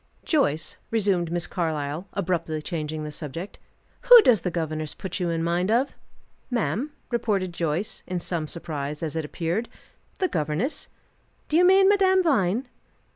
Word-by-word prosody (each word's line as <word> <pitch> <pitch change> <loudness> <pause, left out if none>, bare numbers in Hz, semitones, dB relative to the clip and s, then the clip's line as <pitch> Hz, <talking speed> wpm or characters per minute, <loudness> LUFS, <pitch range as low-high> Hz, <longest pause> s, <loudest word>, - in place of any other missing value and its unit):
"Joyce," 165 - +1
resumed 195 -6 +1
Miss 175 0 -1
Carlyle, 160 0 -3
abruptly 175 -5 -1
changing 155 -3 -4
the 150 - -5
subject, 165 +5 -7 0.5
"who - - +11
does 230 - +5
the 180 - -1
governess 155 -3 -3
put 190 0 -5
you 175 -2 0
in 165 -1 -1
mind 175 +3 0
of?" 245 +5 +2 0.6
"Ma'am?" 245 +2 -1 0.2
repeated 205 -6 0
Joyce, 170 +6 -2
in 180 -1 -2
some 170 -2 -3
surprise, 150 -2 -4
as 160 -1 -3
it 160 - -1
appeared. 170 +9 -2 0.5
"The 375 - +1
governess? 155 - -2 0.6
Do 300 - 0
you 345 - +6
mean 385 +1 +6
Madame 380 -2 +4
Vine?" 245 - +1
175 Hz, 150 wpm, -25 LUFS, 160-230 Hz, 0.6 s, who